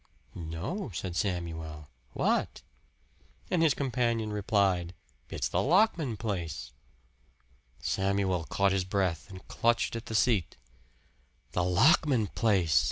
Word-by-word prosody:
"No," 85 - -5
said 90 0 -4
Samuel. 80 -6 -3 0.3
"What?" - - 0 0.9
And 180 - +2
his 160 -4 +4
companion 120 -5 -1
replied, 95 -4 +1 0.3
"It's - - -2
the - - 0
Lockman 165 - +2
place." 85 - -4 1.1
Samuel 95 -3 0
caught 100 +3 +1
his 95 -1 +1
breath 95 -2 -1
and 95 -1 -11
clutched 115 0 +1
at 115 - -6
the 110 - -4
seat. 105 - +2 0.9
"The 90 - 0
Lockman 125 - +4
place!" 95 -8 +3
100 Hz, 110 wpm, -29 LUFS, 90-115 Hz, 1.1 s, his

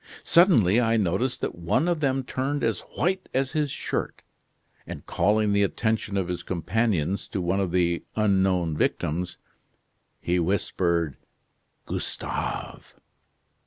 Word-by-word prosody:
Suddenly 120 - +5
I 115 -1 +2
noticed 105 +6 0
that - - -2
one 85 - 0
of 175 -2 +1
them 135 -2 +1
turned 135 +3 -2
as 115 -2 +1 0.2
white 185 +3 0
as 135 0 +1
his 150 -2 0
shirt; - - -3 0.6
and - - -8
calling 105 0 +2
the 100 - +3
attention 110 0 0
of 95 -3 0
his 90 -1 -3
companions 95 0 -1
to - - -3
one 90 +2 0
of 95 -2 0
the 85 -1 +1
unknown 95 -6 +2
victims, 85 +4 -1 0.8
he 90 +1 0
whispered: 85 -3 0 0.7
'Gustave! - - -4
100 Hz, 125 wpm, -26 LUFS, 90-125 Hz, 0.8 s, Suddenly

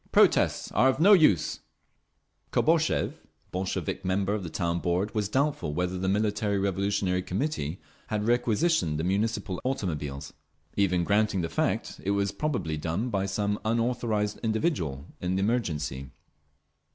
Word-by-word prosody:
Protests - - +3
are 130 - +4
of 130 - 0
no 200 +6 +7
use…." 150 - +4 0.9
Kobozev, 160 0 +2 0.3
Bolshevik 95 +1 -3
member 95 +2 0
of 105 - -1
the 85 - -5
Town 85 0 -1
Board, 90 +5 -1
was 105 -3 -1
doubtful 135 - 0
whether 90 +1 -1
the 95 +1 -1
Military 105 0 +1
Revolutionary 95 -1 0
Committee 95 - -2 0.3
had 105 -1 -1
requisitioned 120 - +2
the - - -1
Municipal 100 0 -1
automobiles. 75 - -3 0.4
Even 90 -3 +2
granting 105 0 +2
the 85 - -2
fact, - - -1
it 95 - -2
was 100 -1 +1
probably 100 - -2
done 85 +10 -2
by 100 -2 0
some 105 +1 -1
unauthorised 115 -2 0
individual, 110 - -1 0.2
in 90 +1 -1
the 95 - 0
emergency. 80 - -1
100 Hz, 140 wpm, -28 LUFS, 90-115 Hz, 0.9 s, no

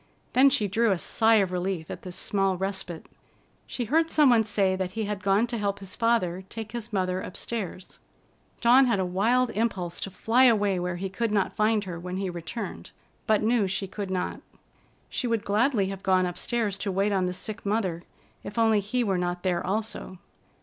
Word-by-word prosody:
Then 265 +2 +6
she 215 -5 +1
drew 225 +4 +2
a 195 - +2
sigh 225 +6 +3
of 195 -4 +2
relief 180 -2 -3
at - - -7
this 180 -1 -7
small 195 -1 0
respite. 190 -3 -4 0.6
She 250 -3 -3
heard 320 +7 +2
some 295 -5 +5
one 230 -2 +5
say 200 -3 +1
that 185 -1 -2
he 220 - 0
had 205 -1 -3
gone 195 +4 +3
to 240 -1 -4
help 200 -1 -1
his 195 -2 -8
father 190 -6 +1
take 220 -1 -7
his 235 -1 -6
mother 185 -2 0
upstairs. 190 -1 -6 0.6
Dawn 255 +2 +6
had 230 -5 +2
a 190 - +1
wild 230 +7 +2
impulse 195 -6 -2
to - - -4
fly 230 +7 +3
away 205 -6 +3
where 180 0 -2
he 190 +2 -3
could 225 +5 -2
not 200 -2 0
find 215 0 +2
her 180 -3 -6
when 180 +1 -5
he 190 -1 -2
returned, 175 +7 -6 0.4
but 215 -1 +3
knew 220 -2 +2
she 195 +1 -2
could 195 +1 -6
not. 185 -1 -2 0.7
She 250 - -2
would 230 -3 0
gladly 210 -1 +2
have 195 -1 -6
gone 185 -1 +3
upstairs 205 +3 -1
to 195 - -2
wait 195 +2 +1
on 190 -2 +1
the - - -1
sick 210 +3 -5
mother, 200 -5 -1 0.4
if 205 - -8
only 225 -2 +4
he 215 +5 -1
were 195 -5 0
not 175 0 -2
there 180 -2 0
also. 205 -1 -3
200 Hz, 200 wpm, -27 LUFS, 185-225 Hz, 0.7 s, Then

